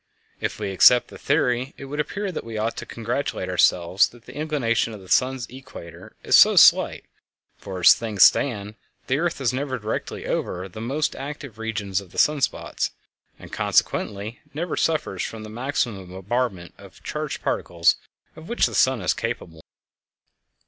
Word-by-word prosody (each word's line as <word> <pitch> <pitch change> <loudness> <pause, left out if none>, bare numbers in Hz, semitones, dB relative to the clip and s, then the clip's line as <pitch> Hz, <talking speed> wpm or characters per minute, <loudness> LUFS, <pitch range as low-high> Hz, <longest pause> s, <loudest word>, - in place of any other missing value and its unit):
If - - -3
we 100 - -3
accept 120 +6 +6
the - - -12
theory, 125 +2 0
it 135 - -8
would 145 +2 -6
appear 200 +6 -2
that 170 - -5
we 115 -1 -7
ought 110 +2 -1
to - - -6
congratulate 115 -4 -3
ourselves 90 +1 +3
that 120 -1 -19
the 125 - -11
inclination 135 -7 0
of - - -10
the 95 - -14
sun's 130 +4 +1
equator 130 -10 -12
is - - +4
so - - +7
slight, - - +5 0.5
for 95 -2 -7
as - - +9
things 110 -4 +2
stand 105 -6 +3 0.3
the 135 +2 0
earth 170 -2 -1
is 130 -3 0
never 130 0 -2
directly 110 -1 -4
over 90 +2 -3
the 105 +4 -9
most 140 +6 -1
active 140 -5 -8
regions 105 -4 -2
of 95 -3 -15
the - - -13
sun 150 -1 +3
spots, - - -1 0.5
and - - -13
consequently 105 +3 0 0.2
never 170 +2 -2
suffers 155 - -1
from 110 -1 -5
the 110 - -8
maximum 120 -5 -2
bombardment 95 0 -3
of - - -15
charged - - -4
particles 85 -1 +1 0.4
of 160 +1 -12
which 235 - +2
the - - -3
sun 130 -4 +3
is 85 - +2
capable. 80 -2 -5
115 Hz, 170 wpm, -23 LUFS, 100-135 Hz, 0.5 s, as